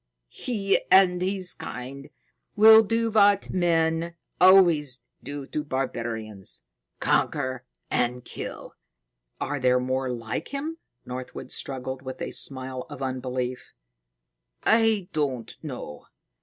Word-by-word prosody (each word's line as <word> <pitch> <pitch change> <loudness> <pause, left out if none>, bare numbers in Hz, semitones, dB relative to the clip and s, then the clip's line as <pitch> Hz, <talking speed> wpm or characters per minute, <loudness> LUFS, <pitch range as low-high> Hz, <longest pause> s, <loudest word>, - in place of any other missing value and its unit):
He 200 -5 0
and 180 -2 +6
his 185 -1 0
kind 140 +3 -8 0.5
will 220 +1 +9
do 225 +1 0
what 205 -2 +4
men 165 -1 +1 0.2
always 170 -8 +5 0.2
do 145 -1 -6
to 150 +2 -3
barbarians 115 -7 -4 0.4
conquer 130 -3 0 0.3
and 125 0 0
kill." - - -7 0.7
"Are 145 +1 -2
there 125 0 +3
more 130 +1 -1
like 115 -1 -4
him?" 305 +4 -4 0.3
Northwood 125 0 -7
struggled 130 -1 -4
with 130 -1 -7
a - - -4
smile 130 -1 -1
of 135 - -7
unbelief. 130 -1 -4 0.9
"I 220 -4 +3
don't 130 -7 -2
know. 125 - -7
140 Hz, 110 wpm, -26 LUFS, 125-185 Hz, 0.9 s, will